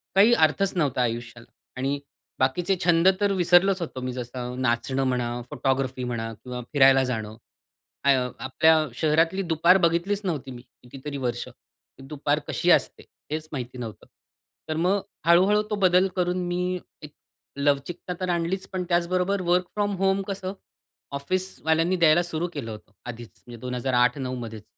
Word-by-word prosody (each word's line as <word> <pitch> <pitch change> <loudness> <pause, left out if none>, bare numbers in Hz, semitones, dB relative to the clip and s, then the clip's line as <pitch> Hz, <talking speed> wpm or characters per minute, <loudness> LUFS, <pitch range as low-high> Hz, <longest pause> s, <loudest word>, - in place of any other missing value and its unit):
काही 210 +5 +6
अर्थच 170 +1 +3
नव्हता 140 -6 +1
आयुष्याला 120 0 -4 0.3
आणि 135 +2 -1 0.4
बाकीचे 170 +9 +1
छंद 170 0 +4
तर 205 -1 +3
विसरलोच 180 +1 +4
होतो 150 -6 -5
मी, 125 0 -3
जसं 125 0 -5
नाचणं 130 +2 0
म्हणा, 120 -1 -1
फोटोग्राफी 130 -1 -1
म्हणा 115 -2 -3
किंवा 125 +3 -7
फिरायला 135 -2 +6
जाणं. 110 -4 -3 0.7
आ 140 - +6
अ, 125 -1 -1
आपल्या 155 +4 +3
शहरातली 165 +6 +2
दुपार 170 +4 +5
बघितलीच 170 +5 0
नव्हती 150 -7 -3
मी, 120 -1 -9 0.2
कितीतरी 135 +3 -7
वर्ष. 120 -3 -3
की - - -19
दुपार 145 +1 0
कशी - - +1
असते, - - +2 0.3
हेच 155 0 -3
माहिती 125 -3 -6
नव्हतं. 115 -4 -7 0.6
तर 155 - -1
मग 185 +5 +1 0.2
हळू-हळू 185 +5 +5
तो 210 - 0
बदल 185 0 +4
करून 180 -1 0
मी 180 +1 -1 0.2
एक 150 -1 -11 0.4
लवचिकता 145 +5 -1
तर 185 -1 -2
आणलीच, 175 +2 -1
पण 185 -1 -3
त्याचबरोबर 180 +3 +1
वर्क 180 +1 +2
फ्रॉम 205 -1 0
होम 195 +1 +2
कसं 195 -1 -4 0.6
ऑफिसवाल्यांनी 165 +2 0
द्यायला 170 -1 +4
सुरू 170 0 -2
केलं 125 -7 -5
होतं, 105 0 -11
आधीच, 120 -1 -7 0.2
म्हणजे 120 -1 -10
2008-9 125 +1 0
मध्येच 110 -3 -7
150 Hz, 150 wpm, -25 LUFS, 125-180 Hz, 0.7 s, काही